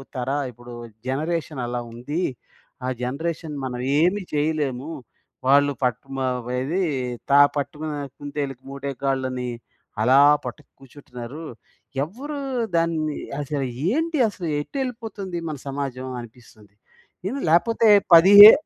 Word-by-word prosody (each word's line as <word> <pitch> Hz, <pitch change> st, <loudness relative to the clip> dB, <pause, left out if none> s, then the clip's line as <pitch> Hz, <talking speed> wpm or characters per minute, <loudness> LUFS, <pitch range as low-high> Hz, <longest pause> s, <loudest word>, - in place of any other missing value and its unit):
తర 125 Hz, 0 st, -2 dB, 0.2 s
ఇప్పుడు 120 Hz, +1 st, -12 dB, 0.3 s
జనరేషన్ 155 Hz, +1 st, -2 dB
అలా 120 Hz, 0 st, -2 dB
ఉంది. 145 Hz, +9 st, -4 dB, 0.6 s
ఆ -, -, -1 dB
జనరేషన్ 150 Hz, +4 st, -3 dB
మనం 125 Hz, -1 st, -4 dB, 0.2 s
ఏమి 185 Hz, +5 st, +3 dB
చేయలేము, 150 Hz, -2 st, -1 dB, 0.6 s
వాళ్ళు 145 Hz, +1 st, +5 dB
పాట్ 125 Hz, -3 st, +1 dB, 0.2 s
మవ 125 Hz, -2 st, -2 dB
ఏది 165 Hz, +9 st, -1 dB, 0.5 s
త -, -, -1 dB, 0.2 s
పట్టుకున్న 150 Hz, +2 st, -3 dB, 0.2 s
కుంతేలుకి 140 Hz, -3 st, -5 dB
మూడే 140 Hz, 0 st, -4 dB
కాళ్ళని 130 Hz, -2 st, -1 dB, 0.5 s
అలా 130 Hz, +4 st, +5 dB, 0.3 s
పట్టుకు 150 Hz, -, -7 dB
కూర్చుంటున్నారు. 135 Hz, +1 st, -9 dB, 0.6 s
ఎవరు 275 Hz, -, -6 dB, 0.4 s
దాన్ని 160 Hz, -3 st, +1 dB, 0.3 s
అసలు 140 Hz, -1 st, -2 dB, 0.2 s
ఏంటి 320 Hz, +5 st, 0 dB
అసలు 180 Hz, -5 st, -6 dB
ఎటెళ్ళిపోతుంది 225 Hz, -, -5 dB
మన 150 Hz, -, -4 dB
సమాజం 135 Hz, -2 st, -4 dB
అనిపిస్తుంది. 110 Hz, -3 st, -16 dB, 0.5 s
ఇంది 270 Hz, +6 st, -3 dB
లేకపోతే 225 Hz, +7 st, +4 dB, 0.3 s
పదిహే 205 Hz, +5 st, +12 dB
145 Hz, 110 wpm, -23 LUFS, 130-170 Hz, 0.6 s, పదిహే